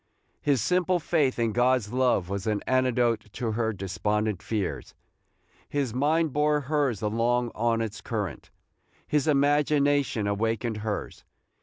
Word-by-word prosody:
His 135 -6 +1
simple 180 +2 +2
faith 150 -5 +1
in 115 -2 +1
God's 120 -1 +1
love 125 -8 +2
was 100 +2 -4
an 105 -1 0
antidote 120 -4 +1
to 115 -3 -2
her 110 0 0
despondent 105 +1 -2
fears. 105 -4 -3 0.7
His 140 -5 -1
mind 150 +3 +1
bore 150 0 +2
hers 140 -7 0
along 120 +3 +1
on 115 0 0
its 110 -2 -4
current. 100 - -4 0.6
His 150 -1 0
imagination 145 -4 +2
awakened 110 +2 -1
hers. 105 -1 -4
120 Hz, 130 wpm, -27 LUFS, 105-145 Hz, 0.7 s, simple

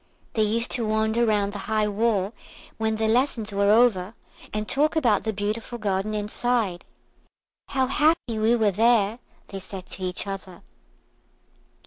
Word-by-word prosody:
They 220 - +1
used 225 +2 +1
to 235 -3 -1
wander 220 +2 +1
round 205 -2 +1
the 205 - -5
high 215 -1 +2
wall 210 -1 0 0.5
when 220 0 0
their 220 0 0
lessons 230 -2 +1
were 200 0 +2
over, 215 -3 +3 0.4
and 215 0 -3
talk 305 +3 +1
about 235 -11 +2
the 220 - +1
beautiful 215 +3 -3
garden 210 -1 -1
inside. 210 -2 -1 0.8
"How 265 -1 +1
happy 270 -4 +1
we 225 +2 +3
were 220 -3 +2
there," 225 +1 +3 0.3
they 195 - -6
said 190 -1 -8
to - - -8
each 185 +1 -3
other. 190 -3 -7
215 Hz, 150 wpm, -25 LUFS, 200-235 Hz, 0.8 s, over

